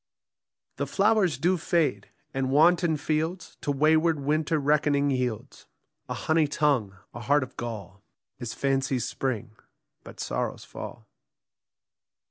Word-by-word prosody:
The - - -2
flowers 200 - +2
do 180 +6 +2
fade; 155 - 0 0.2
and 135 -1 -1
wanton 165 +3 +4
fields 160 +4 -2
To 145 - -1
wayward 155 +2 +3
winter 155 +3 +1
reckoning 145 -1 +2
yields: 125 -4 -3 0.4
A - - -2
honey 160 -1 +2
tongue, 135 -10 +1 0.2
a - - -7
heart 140 +5 +2
of 130 - -10
gall, 105 -5 -6 0.4
Is 120 -2 -5
fancy's 135 -2 0
spring, 120 -4 -3 0.5
but - - -12
sorrow's - - -3
fall. - - -9
145 Hz, 120 wpm, -27 LUFS, 130-160 Hz, 0.5 s, wanton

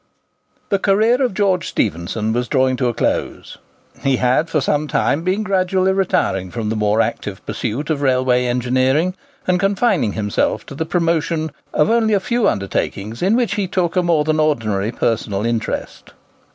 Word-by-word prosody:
The 200 - +1
career 220 +7 +3
of 250 -7 0
George 185 -3 +1
Stephenson 105 +4 -1
was 120 +1 -1
drawing 130 -2 +2
to 125 - 0
a 120 - 0
close. - - -2 0.4
He 135 -1 +2
had 130 +6 +1
for 155 - +1
some 150 +2 0
time 145 +1 +1
been 185 +5 0
gradually 190 -1 +1
retiring 95 - 0
from 110 +1 -4
the 110 - -1
more 105 +1 +2
active 105 -3 -4
pursuit 130 +7 -3
of 145 -2 -1
railway 130 -2 +2
engineering, 130 +7 +1 0.3
and 180 0 +2
confining 195 - +1
himself 105 -2 -1
to - - -9
the 160 +3 -4
promotion 165 -2 0 0.2
of 150 - +2
only 225 -2 +3
a - - +2
few 235 +4 0
undertakings 100 +2 -3
in 195 +5 +3
which 240 -5 +1
he 200 -2 -1
took 180 -2 -1
a 180 - +3
more 170 -4 +2
than 155 +1 0
ordinary 115 -9 0
personal 110 -3 -1
interest. 115 -2 -3
150 Hz, 170 wpm, -19 LUFS, 115-185 Hz, 0.4 s, career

